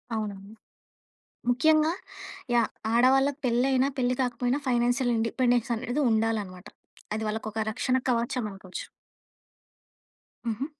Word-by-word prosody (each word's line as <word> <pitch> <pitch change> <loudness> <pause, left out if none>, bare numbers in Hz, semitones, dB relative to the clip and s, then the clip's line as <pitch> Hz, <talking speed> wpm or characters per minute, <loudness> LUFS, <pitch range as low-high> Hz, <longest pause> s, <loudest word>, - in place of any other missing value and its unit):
అవునండి. 205 -1 -5 1.0
ముఖ్యంగా 310 +5 +4 0.6
యాహ్! 235 -2 +3 0.2
ఆడవాళ్ళకి 270 +4 +4
పెళ్లి 245 +1 +2
అయినా, 260 +1 +3
పెళ్లి 250 -1 +1
కాకపోయినా 245 +2 0
ఫైనాన్షియల్ 245 0 +2
ఇండిపెండెన్స్ 240 +1 +1
అనేది 245 +5 -2
ఉండాలన్నమాట. 210 -4 -1 0.5
అది 220 - -3
వాళ్ళకొక 220 0 -3
రక్షణ 255 +3 0
కవచం 240 +1 0
అనుకోవచ్చు. 190 -1 -8 1.6
హుహు. 230 +4 -1
240 Hz, 100 wpm, -27 LUFS, 220-255 Hz, 1.6 s, ముఖ్యంగా